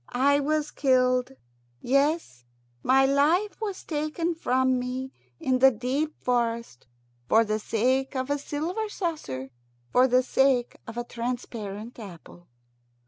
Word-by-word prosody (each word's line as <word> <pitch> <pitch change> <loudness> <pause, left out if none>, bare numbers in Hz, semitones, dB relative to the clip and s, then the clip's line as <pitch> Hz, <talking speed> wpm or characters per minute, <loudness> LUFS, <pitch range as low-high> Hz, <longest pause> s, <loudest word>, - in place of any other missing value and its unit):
I 280 +3 +3
was 300 +1 0
killed 255 -1 +2 0.5
yes, 275 - 0 0.4
my 270 +1 +4
life 325 +10 +2
was 405 -4 -4
taken 310 +2 -2
from 260 -5 +1
me 255 +1 -4 0.3
in 255 -1 +1
the 265 +1 +8
deep 265 +6 -2
forest 235 - -1 0.4
for 225 +1 +5
the 215 0 -1
sake 260 +6 0
of 260 +2 -2
a 285 - 0
silver 340 +10 -3
saucer, 220 - -4 0.4
for 250 +1 +5
the 255 0 +3
sake 260 -2 +2
of 225 +1 -8
a 240 - -1
transparent 235 -2 -5
apple." 175 -3 -12
260 Hz, 130 wpm, -26 LUFS, 240-290 Hz, 0.5 s, the